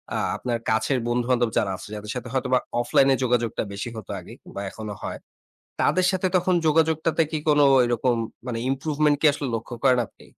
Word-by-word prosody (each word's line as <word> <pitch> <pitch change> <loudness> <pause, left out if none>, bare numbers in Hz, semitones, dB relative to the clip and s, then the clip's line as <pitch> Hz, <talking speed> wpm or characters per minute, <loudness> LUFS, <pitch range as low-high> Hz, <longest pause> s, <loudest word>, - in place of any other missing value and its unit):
আ - - 0 0.2
আপনার 120 -2 -2
কাছের 110 +4 +1
বন্ধু-বান্ধব 120 0 +1
যারা 100 -2 +1
আছে, - - -10
যাদের 105 0 -6
সাথে 125 0 -5
হয়তোবা 130 -1 +2 0.2
অফলাইনে 135 +2 +4
যোগাযোগটা 120 -3 0
বেশি 105 +4 -4
হতো 110 - -8
আগে - - -12
কিংবা 100 - -8
এখনো 105 0 -7
হয়। - - -5 0.6
তাদের 185 0 +3
সাথে 185 0 0
তখন 180 +1 +2
যোগাযোগটাতে 160 +1 +2
কি 155 - -1
কোনো 145 -1 +5 0.2
ওই 120 - +4
রকম 120 +1 +1 0.3
মানে 115 -2 -3
improvement 150 +2 +1
কি - - +2
আসলে 140 -1 -4
লক্ষ্য 115 +2 -6
করেন 130 -2 +5
আপনি? - - -20
125 Hz, 185 wpm, -24 LUFS, 120-150 Hz, 0.6 s, কোনো